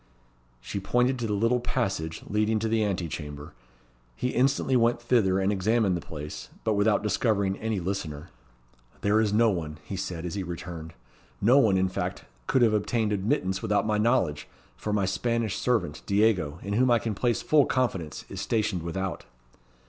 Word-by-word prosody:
She 100 Hz, -, -5 dB
pointed 125 Hz, +6 st, +1 dB
to 115 Hz, -, -1 dB
the 105 Hz, -, -1 dB
little 115 Hz, +4 st, +2 dB
passage 95 Hz, -10 st, -2 dB
leading 110 Hz, +1 st, +1 dB
to 110 Hz, +1 st, -1 dB
the 110 Hz, 0 st, +2 dB
ante 90 Hz, -4 st, -1 dB
chamber. 75 Hz, -1 st, -7 dB, 0.6 s
He 125 Hz, -, -1 dB
instantly 135 Hz, +1 st, +2 dB
went 120 Hz, 0 st, +3 dB
thither, 115 Hz, -6 st, +2 dB
and 95 Hz, +1 st, +1 dB
examined 105 Hz, 0 st, +2 dB
the 85 Hz, -, -3 dB
place, 75 Hz, -5 st, -8 dB
but 110 Hz, -, +1 dB
without 105 Hz, 0 st, +2 dB
discovering 100 Hz, -2 st, +1 dB
any 110 Hz, -2 st, -1 dB
listener. 85 Hz, -4 st, -4 dB, 0.7 s
"There 105 Hz, +2 st, +3 dB
is 105 Hz, -2 st, +1 dB
no 110 Hz, +1 st, +4 dB
one," 80 Hz, -5 st, -4 dB
he 95 Hz, -, -6 dB
said, 90 Hz, -3 st, -4 dB
as 85 Hz, -, -4 dB
he 100 Hz, -, -2 dB
returned. 85 Hz, -2 st, -7 dB, 0.5 s
"No 125 Hz, +7 st, +5 dB
one, 105 Hz, -8 st, +4 dB
in 95 Hz, 0 st, +2 dB
fact, 95 Hz, -, -4 dB, 0.2 s
could 130 Hz, -, +3 dB
have 110 Hz, -2 st, +4 dB
obtained 105 Hz, +1 st, 0 dB
admittance 95 Hz, -2 st, 0 dB
without 105 Hz, -1 st, +1 dB
my 105 Hz, -1 st, +1 dB
knowledge, 105 Hz, -, +1 dB, 0.3 s
for 105 Hz, -, -4 dB
my 105 Hz, -2 st, +1 dB
Spanish 115 Hz, +2 st, -1 dB
servant, 115 Hz, -12 st, 0 dB
Diego, 100 Hz, -7 st, +2 dB
in 100 Hz, -, -3 dB
whom 125 Hz, +4 st, +3 dB
I 120 Hz, -, +5 dB
can 110 Hz, 0 st, -2 dB
place 120 Hz, +3 st, 0 dB
full 150 Hz, -2 st, +4 dB
confidence, 95 Hz, -, -1 dB
is 95 Hz, -, -6 dB
stationed 105 Hz, -3 st, 0 dB
without." 95 Hz, +3 st, -4 dB
105 Hz, 180 wpm, -27 LUFS, 90-115 Hz, 0.7 s, No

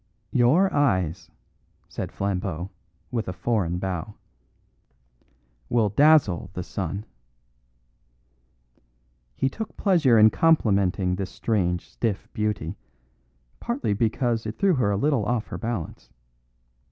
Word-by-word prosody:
"Your 150 Hz, +11 st, +3 dB
eyes," 95 Hz, -, +1 dB, 0.6 s
said -, -, -5 dB
Flambeau, 95 Hz, -2 st, -3 dB, 0.4 s
with 115 Hz, -3 st, -2 dB
a 90 Hz, -, -3 dB
foreign 90 Hz, -3 st, -1 dB
bow, 95 Hz, +2 st, -4 dB, 1.5 s
"will 115 Hz, -3 st, +2 dB
dazzle 135 Hz, -, +4 dB
the 90 Hz, -, -4 dB
sun." 100 Hz, +3 st, -4 dB, 2.3 s
He -, -, +1 dB
took 220 Hz, +10 st, -6 dB
pleasure 160 Hz, -, +4 dB
in 110 Hz, 0 st, +7 dB
complimenting 100 Hz, -, +2 dB
this 95 Hz, -1 st, -3 dB
strange 90 Hz, -6 st, -1 dB
stiff 110 Hz, -5 st, -3 dB
beauty, 105 Hz, -4 st, -2 dB, 0.8 s
partly 235 Hz, -, -1 dB
because 115 Hz, +1 st, 0 dB
it 110 Hz, -, -6 dB
threw 195 Hz, -2 st, +3 dB
her 125 Hz, -9 st, +1 dB
a 100 Hz, -, +1 dB
little 140 Hz, -1 st, +1 dB
off 120 Hz, -2 st, 0 dB
her -, -, -5 dB
balance. 115 Hz, -8 st, -5 dB
105 Hz, 110 wpm, -25 LUFS, 95-125 Hz, 2.3 s, in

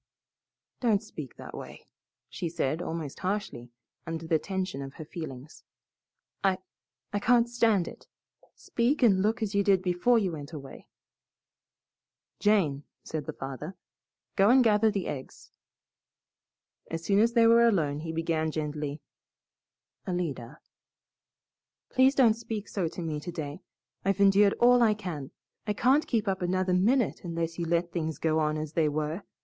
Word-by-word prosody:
"Don't 225 Hz, -4 st, +2 dB
speak 150 Hz, -, -9 dB
that -, -, -10 dB
way," -, -, -9 dB, 0.4 s
she 170 Hz, -, -4 dB
said, 160 Hz, 0 st, -1 dB
almost 160 Hz, -5 st, -5 dB
harshly, 185 Hz, -, -3 dB, 0.4 s
under 165 Hz, 0 st, -4 dB
the 160 Hz, -1 st, +2 dB
tension 185 Hz, -4 st, -3 dB
of 135 Hz, 0 st, -8 dB
her 155 Hz, -, -8 dB
feelings. 150 Hz, -3 st, -8 dB, 0.8 s
"I 190 Hz, -1 st, +3 dB, 0.6 s
I 205 Hz, -, +1 dB
can't 240 Hz, +2 st, +4 dB
stand 230 Hz, -6 st, +2 dB
it. -, -, -11 dB, 0.5 s
Speak 250 Hz, +4 st, 0 dB
and 195 Hz, -5 st, +5 dB
look 220 Hz, +3 st, +1 dB
as 210 Hz, -1 st, -2 dB
you 200 Hz, 0 st, +3 dB
did 190 Hz, -2 st, +3 dB
before 185 Hz, +7 st, +3 dB
you 195 Hz, -5 st, +1 dB
went 150 Hz, 0 st, -8 dB
away." 140 Hz, -3 st, -9 dB, 1.5 s
"Jane," 170 Hz, -10 st, +2 dB, 0.2 s
said 155 Hz, -3 st, -5 dB
the -, -, -4 dB
farmer, 140 Hz, +7 st, -7 dB, 0.6 s
"go 200 Hz, +1 st, +5 dB
and 255 Hz, +1 st, +6 dB
gather 220 Hz, -1 st, +4 dB
the 200 Hz, -3 st, -2 dB
eggs." 135 Hz, -2 st, -7 dB, 1.4 s
As 165 Hz, 0 st, -4 dB
soon 200 Hz, 0 st, +3 dB
as 230 Hz, +2 st, +3 dB
they 230 Hz, -1 st, +5 dB
were 235 Hz, +1 st, +6 dB
alone, 155 Hz, -9 st, +1 dB
he 160 Hz, +1 st, -5 dB
began 160 Hz, -1 st, -1 dB
gently, 150 Hz, -1 st, -4 dB, 1.1 s
"Alida 150 Hz, -7 st, -3 dB, 0.7 s
" -, -, -64 dB
"Please 260 Hz, +2 st, +5 dB
don't 240 Hz, -5 st, +5 dB
speak 220 Hz, -2 st, -6 dB
so 185 Hz, -5 st, -1 dB
to 170 Hz, +2 st, -6 dB
me 155 Hz, -2 st, -3 dB
today. 155 Hz, -1 st, -6 dB, 0.4 s
I've 195 Hz, 0 st, 0 dB
endured 200 Hz, 0 st, +5 dB
all 245 Hz, 0 st, +5 dB
I 220 Hz, -3 st, +4 dB
can. 165 Hz, -10 st, -6 dB, 0.4 s
I 210 Hz, -, +1 dB
can't 265 Hz, +8 st, +3 dB
keep 220 Hz, -4 st, 0 dB
up 190 Hz, -1 st, -1 dB
another 185 Hz, +1 st, 0 dB
minute 225 Hz, +7 st, +2 dB
unless 165 Hz, -1 st, -3 dB
you 170 Hz, -, -1 dB
let 170 Hz, +1 st, 0 dB
things 160 Hz, -2 st, -3 dB
go 160 Hz, -1 st, +1 dB
on 155 Hz, 0 st, 0 dB
as 155 Hz, 0 st, -5 dB
they 160 Hz, -2 st, +2 dB
were. 155 Hz, +4 st, -2 dB
180 Hz, 155 wpm, -28 LUFS, 155-210 Hz, 1.5 s, and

